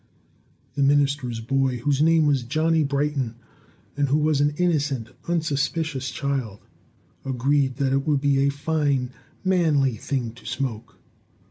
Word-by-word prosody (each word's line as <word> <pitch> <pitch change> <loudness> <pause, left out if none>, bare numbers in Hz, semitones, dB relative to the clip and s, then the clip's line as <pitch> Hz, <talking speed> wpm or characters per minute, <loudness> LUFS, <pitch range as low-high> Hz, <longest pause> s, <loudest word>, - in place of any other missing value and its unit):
The 145 - -2
minister's 140 -4 +2
boy, 130 +2 0
whose 140 +3 0
name 160 0 +4
was 140 -3 +2
Johnny 155 +6 +1
Brighton, 140 -4 -1 0.6
and 145 -1 +1
who 145 - +3
was 150 -2 +2
an 145 0 +1
innocent, 145 -9 0 0.2
unsuspicious 155 -3 -1
child, 130 -8 -3 0.6
agreed 135 +1 +1
that 135 0 0
it 135 +1 0
would 145 -2 +2
be 140 -1 +2
a 140 +1 +3
fine, 140 -3 0 0.3
manly 155 -9 +2
thing 125 -1 -3
to 120 - -17
smoke. 120 -6 -4
140 Hz, 135 wpm, -24 LUFS, 130-150 Hz, 0.6 s, name